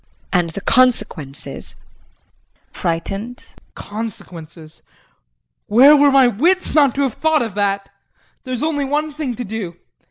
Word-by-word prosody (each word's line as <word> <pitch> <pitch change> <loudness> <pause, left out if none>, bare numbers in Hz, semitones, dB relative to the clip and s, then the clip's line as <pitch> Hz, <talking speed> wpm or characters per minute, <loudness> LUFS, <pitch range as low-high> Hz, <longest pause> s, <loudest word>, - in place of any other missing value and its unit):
And 175 -3 +1
the 180 +5 -7
consequences? 190 - 0
JEAN - - -35
[Frightened]. 195 +8 -4 0.3
Consequences 170 -7 -9 0.9
where 265 +8 +7
were 290 0 +5
my 270 -1 +5
wits 340 - +1
not 285 -5 +4
to 280 - +1
have 265 -5 -1
thought 315 -1 +1
of 225 -4 -5
that! 200 -1 -1 0.6
There 255 - -8
is 245 - -4
only 305 -2 -1
one 295 +2 -2
thing 285 -5 -4
to 245 - -5
do. 205 -5 -6
230 Hz, 135 wpm, -19 LUFS, 195-280 Hz, 0.9 s, where